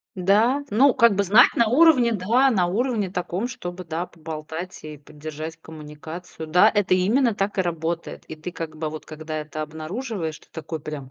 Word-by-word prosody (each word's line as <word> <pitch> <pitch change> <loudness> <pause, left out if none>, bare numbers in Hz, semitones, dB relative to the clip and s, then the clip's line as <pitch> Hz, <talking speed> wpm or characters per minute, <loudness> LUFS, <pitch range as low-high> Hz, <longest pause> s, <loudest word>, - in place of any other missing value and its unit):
Да, 215 +9 +2
ну 260 +5 +5
как 235 -3 +5
бы 200 - +2
знать 210 +6 +6
на 235 - +3
уровне, 255 -2 +5
да, 230 +7 +3
на 195 -8 +2
уровне 215 +1 -1
таком, 180 +4 -3
чтобы, 180 -6 -7
да, 165 +1 -4
поболтать 160 +2 -7
и 155 -1 -8
поддержать 155 +2 -8
коммуникацию. 160 +2 -9
Да, 180 +7 +6
это 205 -4 +2
именно 225 +6 +2
так 200 0 -1
и - - +5
работает. 170 -1 -3
И 160 - -7
ты 155 +3 -7
как 165 -2 -7
бы 155 0 -3
вот 155 -1 -8
когда 155 0 -6
это 155 0 -5
обнаруживаешь, 160 - -5
ты - - -23
такой 160 0 -6
прям: 145 -3 -7
175 Hz, 185 wpm, -23 LUFS, 155-215 Hz, -, знать